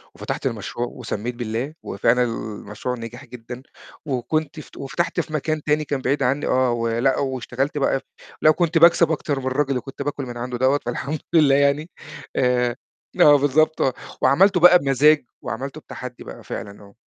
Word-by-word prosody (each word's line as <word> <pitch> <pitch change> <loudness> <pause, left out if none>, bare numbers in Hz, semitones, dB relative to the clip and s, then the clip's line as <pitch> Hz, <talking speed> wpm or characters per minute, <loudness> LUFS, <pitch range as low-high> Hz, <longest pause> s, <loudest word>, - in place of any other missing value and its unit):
وفتَحْت - - -5
المشروع، 120 0 -3
وسمّيت 120 0 -5
بالله 120 +5 -3
وفعلًا 115 +5 +1
المشروع 110 +1 -4
نِجِح 120 +4 -9
جدًا، 125 +1 -10 0.4
وكنت 150 +3 -2
ف 155 - -11
وفتَحْت 150 +6 -2
في 155 -2 -4
مكان 155 0 -1
تاني 150 0 +1
كان 140 -2 -2
بعيد 140 +2 0
عني 135 +3 0
آه، 130 -1 +2
ولأ، 120 +3 +1
واشتغلت 130 +1 -2
بقى 135 -1 +1 0.4
لأ، 155 - +6
وكنت 165 +1 +2
باكسب 170 0 +6
أكتر 145 -2 -1
من 130 - -7
الراجل 135 +2 0
اللي 130 -2 0
كنت 135 +2 -9
باكل 140 -1 -3
من 120 -1 -7
عَندُه 125 +1 -4
دوَّة، 130 +3 +2
فالحمد 135 +5 -3
لله 150 -5 +5
يعني 140 +3 +2 0.5
آآ، 125 -1 +1 0.5
آه 145 -1 +8
بالضبط 145 +3 +2
آه. 130 - +2 0.3
وعملتُه 185 +5 +4
بقى 180 +1 +8
بمزاج 140 +1 +3 0.2
وعملتُه 135 +8 -5
بتحدّي 125 -3 -9
بقى - - -10
فعلًا، 100 0 -7
آه. 100 0 -16
135 Hz, 170 wpm, -22 LUFS, 125-150 Hz, 0.5 s, آه